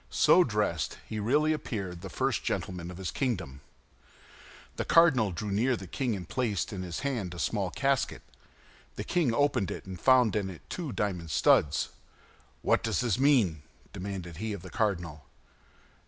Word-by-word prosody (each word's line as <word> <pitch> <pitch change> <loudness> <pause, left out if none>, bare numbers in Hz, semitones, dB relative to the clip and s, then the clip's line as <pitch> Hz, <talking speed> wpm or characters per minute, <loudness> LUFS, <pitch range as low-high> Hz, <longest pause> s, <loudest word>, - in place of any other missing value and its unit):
So 180 - +5
dressed, 105 - -1
he 110 - -4
really 150 +9 +2
appeared 95 - -4
the - - -7
first - - -1
gentleman 90 -2 -3
of 90 - -8
his 95 -2 -4
kingdom. 90 - -2 1.2
The - - 0
cardinal 140 - +5
drew 100 +4 -4
near 120 +6 +2
to - - -1
the 95 - -8
king, 120 +5 -2
and 90 -4 -7
placed 115 -5 -1
in 95 - -4
his 90 -2 -5
hand 115 -11 -2
a - - -8
small 100 +1 -1
casket. 135 +4 0 0.7
The - - -4
king 165 -9 +1
opened 130 -5 +1
it, - - -6
and 95 -2 -8
found 125 -5 +5
in 100 -2 0
it 90 - -10
two 165 -6 -4
diamond 90 -7 -2
studs. 75 -1 +3 0.7
"What - - +3
does - - 0
this 120 -3 0
mean?" 120 - +3 0.3
demanded 95 -4 -6
he 110 +2 -3
of 95 -4 -7
the 95 - -10
cardinal. 85 -9 -2
105 Hz, 170 wpm, -29 LUFS, 90-125 Hz, 1.2 s, So